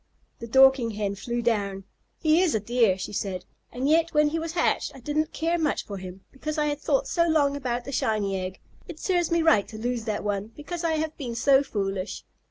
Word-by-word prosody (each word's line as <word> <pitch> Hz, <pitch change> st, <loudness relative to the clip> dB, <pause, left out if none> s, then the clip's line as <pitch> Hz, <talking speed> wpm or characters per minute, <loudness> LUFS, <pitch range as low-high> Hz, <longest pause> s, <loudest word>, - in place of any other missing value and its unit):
The 230 Hz, -, -7 dB
Dorking 265 Hz, 0 st, +5 dB
Hen 205 Hz, -1 st, -1 dB
flew 235 Hz, +4 st, -3 dB
down. 200 Hz, -4 st, 0 dB, 0.3 s
"He 315 Hz, +1 st, +3 dB
is 355 Hz, -8 st, +2 dB
a -, -, +2 dB
dear," 225 Hz, -2 st, +2 dB
she 190 Hz, -, -6 dB
said, 185 Hz, -3 st, -3 dB, 0.3 s
"and 255 Hz, +3 st, -2 dB
yet 325 Hz, +1 st, +2 dB
when 300 Hz, 0 st, +5 dB
he 325 Hz, +2 st, -2 dB
was 325 Hz, 0 st, -4 dB
hatched 350 Hz, -, +1 dB
I -, -, -10 dB
didn't 300 Hz, +4 st, -1 dB
care 335 Hz, +2 st, 0 dB
much 305 Hz, -2 st, 0 dB
for 200 Hz, -, -6 dB
him, 185 Hz, 0 st, -9 dB
because 305 Hz, +3 st, -5 dB
I 300 Hz, -, +2 dB
had 290 Hz, 0 st, -2 dB
thought 280 Hz, -3 st, +1 dB
so 335 Hz, 0 st, +2 dB
long 290 Hz, -3 st, +2 dB
about 245 Hz, -3 st, -3 dB
the 275 Hz, -, -5 dB
shiny 210 Hz, -6 st, 0 dB
egg. 185 Hz, 0 st, -4 dB, 0.3 s
It 320 Hz, -2 st, -9 dB
serves 350 Hz, -3 st, +1 dB
me 335 Hz, -1 st, +2 dB
right 290 Hz, -12 st, +4 dB
to 215 Hz, -, -9 dB
lose 240 Hz, 0 st, -2 dB
that 215 Hz, -2 st, -2 dB
one, 205 Hz, +1 st, -3 dB
because 340 Hz, +3 st, -6 dB
I 330 Hz, -1 st, +1 dB
have 315 Hz, 0 st, -2 dB
been 245 Hz, -6 st, -5 dB
so 270 Hz, +3 st, +5 dB
foolish. 195 Hz, -7 st, -3 dB
260 Hz, 225 wpm, -26 LUFS, 210-310 Hz, 0.3 s, Dorking